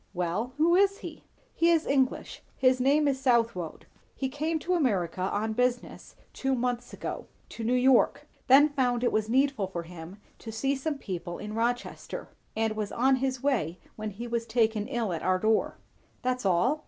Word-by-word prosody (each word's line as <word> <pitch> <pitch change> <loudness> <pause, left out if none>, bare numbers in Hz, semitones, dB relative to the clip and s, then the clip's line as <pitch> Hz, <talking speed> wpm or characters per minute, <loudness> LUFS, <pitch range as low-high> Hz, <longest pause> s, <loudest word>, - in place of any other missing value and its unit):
"Well 180 +8 -2
who 335 +3 +4
is 395 +1 +4
he?" - - -9 0.3
"He 335 - +3
is 330 -2 +3
English; 270 -2 0 0.2
his 255 -1 +3
name 290 +3 +3
is 270 -1 0
Southwode. 230 - 0 0.3
He 265 - -2
came 310 +4 -1
to 340 +4 -2
America 195 - 0
on 205 +4 -1
business 245 +1 -2 0.2
two 270 0 0
months 245 0 -2
ago; - - -6 0.2
to 230 - -7
New 240 +3 +1
York; 255 0 +3 0.2
then 280 +3 +7
found 250 -4 0
it 245 - +2
was 215 0 0
needful 265 -5 +2
for 175 -2 -5
him 170 +2 -10 0.2
to 225 - -8
see 270 +6 0
some 290 +2 -3
people 175 -7 -5
in 210 +1 -7
Rochester; 235 +2 -3 0.3
and 220 0 0
was 210 -1 -3
on 260 +2 +3
his 260 -1 -2
way 205 - 0 0.2
when 215 0 -4
he 215 +4 -7
was 235 0 -2
taken 220 -2 +1
ill 235 -7 -2
at 165 - -4
our 185 0 +2
door." 215 +3 +1 0.5
"That's 250 -4 0
all?" 215 - +2
245 Hz, 180 wpm, -28 LUFS, 215-270 Hz, 0.5 s, then